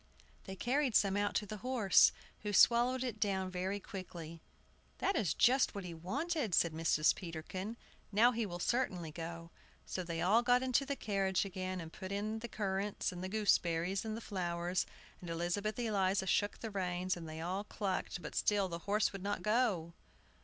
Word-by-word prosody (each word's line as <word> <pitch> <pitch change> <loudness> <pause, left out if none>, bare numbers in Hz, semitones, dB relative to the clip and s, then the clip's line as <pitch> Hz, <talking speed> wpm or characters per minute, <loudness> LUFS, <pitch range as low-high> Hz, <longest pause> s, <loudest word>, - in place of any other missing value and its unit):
They 190 - -6
carried 255 +3 0
some 195 -1 +4
out 205 0 0
to 210 - +1
the 215 +1 -6
horse, 240 -4 +5 0.3
who 210 -1 -3
swallowed 245 +5 +5
it 235 -4 -4
down 190 -3 0
very 185 +2 -2
quickly. 170 -5 -8 0.6
"That 390 - 0
is 160 -7 +1
just 255 -1 +4
what 200 - -4
he 175 -1 -6
wanted," 245 - -1
said 170 -2 +3
Mrs. 160 -1 +3
Peterkin; 185 +5 -6 0.3
"now 225 +4 +5
he 230 -1 -1
will 175 -2 -5
certainly 180 -6 -1
go!" 165 +1 -7 0.3
So 185 - -3
they 170 -1 -4
all 205 +7 +4
got 245 +1 +3
into 260 +2 +1
the 280 - -1
carriage 195 -5 0
again, 185 -1 -4
and 165 -1 -8
put 190 0 -7
in 215 +2 -2
the 235 - -5
currants 200 -2 -2
and 180 0 -7
the 185 - -3
gooseberries 185 -3 +1
and 220 0 -3
the - - -7
flowers; 175 -3 -1 0.3
and 175 - -7
Elizabeth 175 +6 -1
Eliza 200 -5 +1
shook 205 +2 +1
the 225 - -4
reins, 185 -1 -1
and 165 -2 -8
they 155 0 -6
all 185 +5 -2
clucked; 195 -4 -3
but - - -6
still 205 -2 +2
the 170 -1 -5
horse 210 0 +2
would 195 - -6
not 205 +1 -2
go! 210 -7 +1
195 Hz, 185 wpm, -35 LUFS, 175-220 Hz, 0.6 s, horse